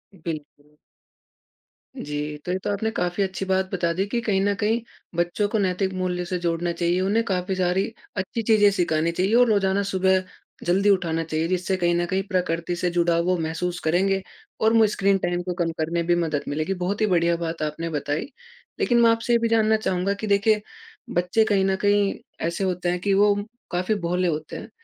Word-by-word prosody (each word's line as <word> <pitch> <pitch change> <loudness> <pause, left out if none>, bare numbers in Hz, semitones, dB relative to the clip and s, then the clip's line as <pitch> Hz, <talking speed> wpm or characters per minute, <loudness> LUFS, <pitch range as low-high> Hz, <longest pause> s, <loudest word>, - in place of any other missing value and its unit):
बिल्कुल। 150 -3 -8 1.2
जी। 150 0 -4
तो 180 - -2
ये 185 - 0
तो - - -2
आपने 205 +2 -1
काफ़ी 180 +3 0
अच्छी 190 0 -3
बात 190 0 0
बता 170 -3 +1
दी 190 +3 0
कि 235 +4 -1
कहीं 205 -4 +1
न 200 +1 +2
कहीं 220 +4 0 0.3
बच्चों 175 +4 0
को 220 - 0
नैतिक 190 0 0
मूल्य 180 -1 -2
से 180 +1 -2
जोड़ना 170 0 -1
चाहिए 170 +1 0
उन्हें 205 +4 +2
काफ़ी 190 -2 -1
सारी 185 +1 +1 0.3
अच्छी 190 +4 -2
चीज़ें 215 -2 +5
सिखानी 170 -4 +1
चाहिए 185 +5 0
और 245 0 +6
रोज़ाना 200 -1 +2
सुबह 190 -1 +2 0.4
जल्दी 195 +4 +3
उठाना 170 -4 +1
चाहिए 160 0 -1
जिससे 185 +1 0
कहीं 175 -1 +1
न 175 0 +1
कहीं 190 +2 -1
प्रकृति 175 -2 -1
से 175 +1 -1
जुड़ा 170 -1 +2
वो 180 +2 +1
महसूस 170 +2 -2
करेंगे 190 +4 +2 0.4
और 220 +1 +4
वो 225 -1 +6
स्क्रीन 200 -1 +2
टाइम 175 -1 -1
को 180 0 -3
कम 165 - -1
करने 165 +2 -1
में 170 - -2
भी 175 - +4
मदद 150 -3 -2
मिलेगी। 155 +6 -1
बहुत 195 +4 -1
ही - - +5
बढ़िया 170 -2 +2
बात 165 0 -4
आपने 155 +2 -3
बताई। 150 0 -2 0.5
लेकिन 240 -2 +3
मैं 230 - +6
आपसे 230 +1 0
ये 235 - +4
भी 230 - +1
जानना 220 -1 +3
चाहूँगा 190 -2 0
कि 200 +2 -5
देखिए 210 +1 +3 0.5
बच्चे 180 +1 +2
कहीं 200 -3 +2
न 190 0 +2
कहीं 205 -1 +3 0.3
ऐसे 170 +3 -2
होते 180 -1 -1
हैं 180 0 -1
कि 200 +1 +1
वो 205 +1 +5 0.4
काफ़ी 185 +4 0
भोले 180 +2 0
होते 155 -2 -3
हैं। - - -8
185 Hz, 205 wpm, -24 LUFS, 170-200 Hz, 1.2 s, और